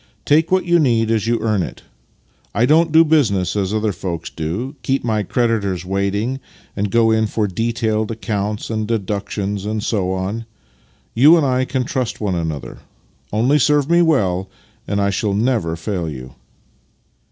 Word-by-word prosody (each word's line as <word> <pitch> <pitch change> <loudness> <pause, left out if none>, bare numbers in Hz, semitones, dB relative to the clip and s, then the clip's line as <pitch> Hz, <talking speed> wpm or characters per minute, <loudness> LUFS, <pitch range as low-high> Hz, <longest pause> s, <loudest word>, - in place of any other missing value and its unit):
" - - -40
Take 155 +2 +3
what 185 -1 +2
you 175 -1 +3
need 115 -6 +2
as 110 -1 0
you 115 0 +1
earn 105 -4 +1
it. - - -6 0.7
I 115 +4 +3
don't 160 +4 +4
do 160 +1 +6
business 110 - +2
as 100 -2 -1
other 110 0 0
folks 85 -3 -5
do 90 - -4
— - - -37
keep 135 +1 -1
my 110 -2 0
creditors 100 -4 -1
waiting, 100 +7 -1 0.4
and 100 0 -1
go 115 +2 +3
in 110 0 +2
for 105 +1 -1
detailed 110 +1 -1
accounts 105 -1 -3
and 110 -1 -2
deductions 100 -2 -2
and 105 0 -3
so 95 -5 0
on. 100 +5 -3 0.7
You 150 +8 +7
and 155 - +2
I 130 -1 +1
can 130 0 -1
trust 125 -1 -3
one 105 -3 -1
another. 80 -4 -4 0.5
Only 125 +8 +2
serve 145 +2 +2
me 170 0 +5
well, 95 - +1 0.4
and 100 0 -1
I 100 0 +1
shall 100 +1 -1
never 110 -7 0
fail 85 0 -3
you." 65 -3 -8
110 Hz, 175 wpm, -19 LUFS, 100-125 Hz, 0.7 s, You